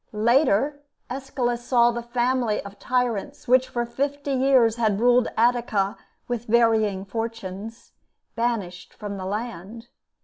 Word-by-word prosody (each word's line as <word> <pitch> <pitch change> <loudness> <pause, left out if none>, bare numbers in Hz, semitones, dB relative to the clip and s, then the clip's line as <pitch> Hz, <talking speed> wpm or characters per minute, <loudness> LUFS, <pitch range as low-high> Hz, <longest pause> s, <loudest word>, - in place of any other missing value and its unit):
Later, 255 +5 +2 0.3
Aeschylus 250 -2 -2
saw 240 -1 +4
the 235 0 -4
family 240 -1 0
of 200 0 -11
tyrants, 245 -5 -2
which 255 +1 +4
for 240 -1 -2
fifty 280 +4 -3
years 255 -4 +3
had 215 -4 +1
ruled 245 0 +4
Attica 230 -4 +1 0.3
with 240 -1 -3
varying 220 -4 +2
fortunes, 225 0 -6 0.4
banished 210 -7 -3
from 205 -2 -6
the 185 - -6
land. 220 +2 -6
235 Hz, 125 wpm, -24 LUFS, 210-245 Hz, 0.4 s, saw